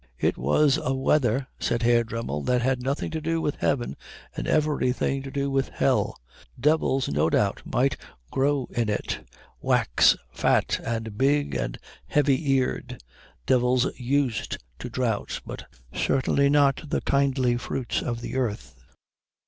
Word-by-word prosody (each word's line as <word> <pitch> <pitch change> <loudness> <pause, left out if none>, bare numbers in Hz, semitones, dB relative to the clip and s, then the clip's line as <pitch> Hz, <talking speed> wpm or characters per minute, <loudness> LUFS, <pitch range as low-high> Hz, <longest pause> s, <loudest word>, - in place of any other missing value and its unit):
"It - - +1
was 135 - +3
a 135 - 0
weather," 130 -1 +2
said 120 0 -1
Herr 120 0 +4
Dremmel, 110 -11 -4
"that 125 -1 +2
had 130 0 +1
nothing 135 +3 -2
to 160 - -3
do 165 +1 0
with 150 -2 -2
heaven 120 - 0 0.4
and - - -4
everything 135 -3 +1
to 135 - -7
do 140 0 -2
with 135 -1 0
hell. - - +1 0.4
Devils 140 -1 +2
no 75 +3 +1
doubt 100 +3 +1
might 130 +1 +1 0.3
grow 140 -1 +1
in 115 -2 -1
it, 105 - -2 0.4
wax - - +4
fat - - +1
and 115 -2 -4
big 145 +2 +2
and - - -2 0.3
heavy 145 0 +2
eared, 130 - -1 0.4
devils 125 0 +3
used 130 -1 -1 0.2
to - - -6
drought, 115 -5 -2
but - - -8 0.3
certainly 140 +1 +2
not 145 +1 +2
the - - 0
kindly 135 -3 +2
fruits 125 +1 -2
of 120 -1 -3
the 130 - -4
earth." 105 - -2
130 Hz, 145 wpm, -25 LUFS, 120-140 Hz, 0.4 s, Herr